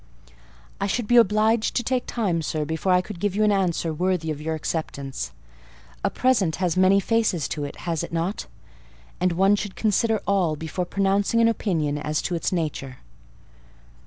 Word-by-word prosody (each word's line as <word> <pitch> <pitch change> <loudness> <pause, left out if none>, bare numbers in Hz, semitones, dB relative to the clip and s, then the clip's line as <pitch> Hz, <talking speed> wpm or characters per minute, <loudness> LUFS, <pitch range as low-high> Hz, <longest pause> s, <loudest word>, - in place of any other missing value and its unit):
"I 200 - 0
should 240 +3 -1
be 240 - +4
obliged 220 0 +3
to 240 - +1
take 250 +1 -1
time, 190 -8 0
sir, 155 -1 -2
before 160 +4 -1
I 180 0 +5
could 190 -1 -9
give 205 0 -1
you 215 - +2
an 210 - +4
answer 175 -4 0
worthy 175 -1 0
of 150 -1 -5
your 160 +1 -2
acceptance: 140 - -4 0.7
a - - +2
present 230 -11 +1
has 180 -2 0
many 185 +1 +5
faces 210 - +1
to 150 -2 -3
it, 145 - -7
has 165 -3 -2
it - - -6
not? 170 +5 -2 0.7
and 180 -1 +2
one 195 +4 +4
should 205 -1 -5
consider 220 +1 +1
all, 185 -6 +1
before 160 +4 -4
pronouncing 195 +4 +1
an 230 - +5
opinion 160 -10 0
as 150 +1 -1
to 180 - -2
its 170 - -1
nature." 150 -7 -3
185 Hz, 180 wpm, -24 LUFS, 160-210 Hz, 0.7 s, I